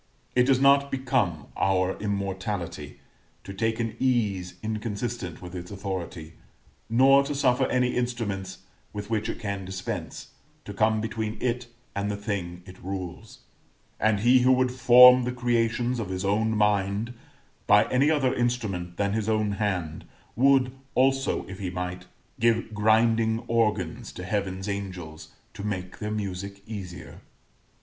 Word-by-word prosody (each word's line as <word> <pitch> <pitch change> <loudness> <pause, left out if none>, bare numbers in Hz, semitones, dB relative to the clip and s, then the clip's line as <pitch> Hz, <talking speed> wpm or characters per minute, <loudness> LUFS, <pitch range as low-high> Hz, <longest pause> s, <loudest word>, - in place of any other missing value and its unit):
It 125 0 +4
does 135 -2 +4
not 140 +1 +5
become 125 - 0
our 95 -1 +1
immortality 95 -6 -4 0.4
to 95 - -8
take 110 +3 -1
an 115 -2 -2
ease 100 -9 0
inconsistent 110 -4 -4
with 90 0 -9
its 90 -1 -7
authority, 90 -5 -5 0.6
nor 135 +4 +6
to 145 +1 -4
suffer 130 -1 +2
any 125 -1 +1
instruments 100 -6 -3 0.3
with 105 +1 -6
which 110 0 0
it - - -3
can 100 -2 -4
dispense, 95 0 -6 0.4
to 100 - -7
come 110 +1 +2
between 110 -1 -3
it 125 0 -1 0.3
and 100 +1 -1
the 100 - -2
things 90 -4 -5
it 90 0 -13
rules: 95 -2 -7 0.6
and 110 -2 +2
he 125 +3 +6
who 125 +1 +4
would 130 -1 +3
form 125 0 +8
the 125 - -1
creations 120 0 0
of 105 -5 -4
his 95 +1 -3
own 105 +3 +1
mind 105 +2 +1 0.5
by 105 0 +6
any 135 +4 +3
other 140 -5 +2
instrument 105 -8 -2
than 100 0 0
his 110 0 -1
own 110 -1 +1
hand, 95 -6 -2 0.3
would, 130 0 +4 0.2
also, 135 +1 +2
if 95 +1 -9
he 95 -3 -3
might, 90 0 -5 0.3
give 115 -1 +1
grinding 110 +1 +3
organs 105 -7 0
to 90 - -7
Heaven's 95 0 -2
angels, 90 -6 -6 0.3
to - - -8
make 95 -3 -4
their 105 - -3
music 100 -1 -5
easier. 100 -5 -8
105 Hz, 145 wpm, -26 LUFS, 95-120 Hz, 0.6 s, form